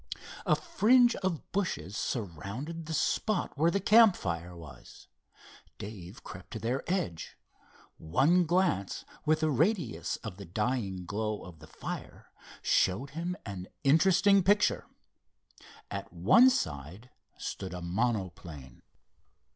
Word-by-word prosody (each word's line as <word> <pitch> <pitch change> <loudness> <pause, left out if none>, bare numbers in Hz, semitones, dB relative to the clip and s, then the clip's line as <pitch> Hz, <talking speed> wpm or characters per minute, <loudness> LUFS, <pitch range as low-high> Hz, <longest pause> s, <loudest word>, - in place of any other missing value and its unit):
A - - +5
fringe 250 -7 +4
of 185 -5 -3
bushes 105 - -2
surrounded 120 - -4
the 160 - -4
spot 200 +6 0
where 160 +4 +3
the 200 - +1
campfire 100 - +3
was. 75 -7 -13 0.7
Dave 100 -4 -9
crept - - -10
to - - -4
their 125 +4 -1
edge. 90 - -3 0.6
One 155 - +3
glance 175 - 0 0.2
with 155 0 +3
the 155 -1 +2
radius 160 - 0
of 105 -5 -6
the 100 - -9
dying 100 -1 -2
glow 105 +3 -3
of 85 -3 -12
the 80 - -13
fire - - -8 0.3
showed 120 +10 +2
him 170 +4 -3
an 95 -3 -6 0.2
interesting 190 +7 +5
picture. 205 +3 +2 1.0
At - - -5
one 105 - +6
side 85 - -4 0.3
stood 95 -2 -5
a 90 - -6
monoplane. 90 - -3
120 Hz, 120 wpm, -30 LUFS, -, 1.0 s, one